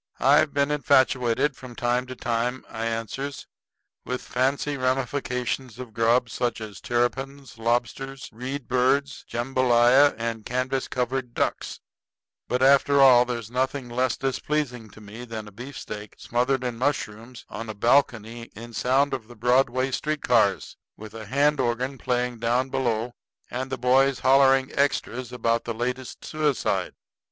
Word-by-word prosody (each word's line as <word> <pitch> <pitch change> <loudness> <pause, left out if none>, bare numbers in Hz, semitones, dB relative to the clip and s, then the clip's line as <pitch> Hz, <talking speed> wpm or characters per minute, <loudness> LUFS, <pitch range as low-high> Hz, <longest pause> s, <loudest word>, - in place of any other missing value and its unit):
"I've 145 +2 +4
been 140 0 +1
infatuated 135 -3 +2
from 125 -2 -11
time 120 +2 0
to 130 - -7
time," 120 +2 -2
I 115 +1 -4
answers, 115 +5 -4 0.6
"with 125 0 -4
fancy 135 +3 0
ramifications 130 -1 -2
of 125 -3 -9
grub 115 +2 +3
such 120 0 -2
as 105 -4 -8
terrapins, 135 +2 -2
lobsters, 125 +4 -2
reed 125 +3 -5
birds, 130 +3 +1
jambolaya, 125 +2 +4
and 115 -1 -3
canvas 130 +2 -2
covered 125 -1 -2
ducks; - - -2 0.7
but 125 +1 0
after 140 +1 +5
all 125 -3 +7
there's 120 -3 -5
nothing 130 0 -1
less 125 +1 0
displeasing 130 -2 -2
to 110 - -15
me 105 +3 -9
than 110 -3 -7
a - - -11
beefsteak 105 -3 -8
smothered 125 +2 0
in 120 -2 -3
mushrooms 120 -3 -3
on 115 +1 -7
a 110 - -5
balcony 115 -1 +1
in 115 +1 -10
sound 130 +7 +2
of 125 -5 -4
the 120 - -13
Broadway 125 +3 +2
streetcars, 120 - +1 0.2
with 110 0 -10
a 110 -2 -8
hand 145 +4 +2
organ 125 +2 -1
playing 125 -1 -1
down 120 +3 +1
below, 120 -2 -1 0.4
and 130 +2 -3
the 130 - -2
boys 130 +2 +3
hollering 135 0 +4
extras 130 -3 -1
about 115 -1 0
the 115 - -3
latest 125 +2 -4
suicide. 150 -5 -1
125 Hz, 145 wpm, -25 LUFS, 115-135 Hz, 0.7 s, all